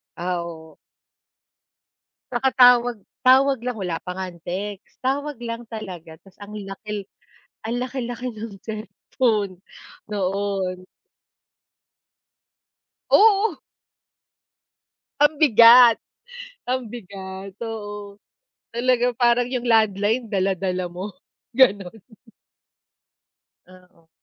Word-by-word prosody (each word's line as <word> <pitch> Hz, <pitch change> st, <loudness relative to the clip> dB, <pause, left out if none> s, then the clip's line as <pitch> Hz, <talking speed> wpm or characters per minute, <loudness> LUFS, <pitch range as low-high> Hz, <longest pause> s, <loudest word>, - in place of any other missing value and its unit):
Ah, 175 Hz, 0 st, -2 dB
oo. 160 Hz, -2 st, -11 dB, 1.5 s
Nakatawag 245 Hz, -1 st, +4 dB, 0.3 s
tawag 265 Hz, +1 st, +5 dB
lang, 250 Hz, -1 st, -2 dB
wala 180 Hz, -5 st, -2 dB
pa 180 Hz, -, -4 dB
nga 190 Hz, +1 st, -4 dB
ang 170 Hz, -, -15 dB
text, 195 Hz, +3 st, -6 dB
tawag 280 Hz, +1 st, -2 dB
lang 230 Hz, 0 st, -5 dB
talaga, 185 Hz, -8 st, -8 dB
'tas 195 Hz, -2 st, -21 dB
ang 205 Hz, +1 st, -10 dB
laki, 205 Hz, 0 st, -7 dB, 0.6 s
ang 230 Hz, +2 st, -2 dB
laki-laki 250 Hz, -1 st, -4 dB
ng 220 Hz, -1 st, -8 dB
cellphone 215 Hz, -2 st, -2 dB, 0.5 s
noon. 195 Hz, -2 st, -2 dB, 2.2 s
Oo. 410 Hz, -6 st, +4 dB, 1.6 s
Ang 295 Hz, +1 st, +4 dB
bigat 235 Hz, -4 st, +7 dB, 0.7 s
ang 255 Hz, 0 st, 0 dB
bigat, 190 Hz, -2 st, -9 dB
oo, 205 Hz, -2 st, -7 dB, 0.5 s
talaga, 245 Hz, +1 st, +1 dB
parang 240 Hz, 0 st, +3 dB
yung 250 Hz, -2 st, -3 dB
landline 220 Hz, 0 st, +2 dB
dala-dala 190 Hz, -2 st, -1 dB
mo 180 Hz, +4 st, -6 dB, 0.5 s
gano'n. 205 Hz, -8 st, +4 dB, 1.8 s
Ah, 185 Hz, 0 st, -18 dB
oh. 165 Hz, -2 st, -28 dB
215 Hz, 90 wpm, -23 LUFS, 190-245 Hz, 2.2 s, bigat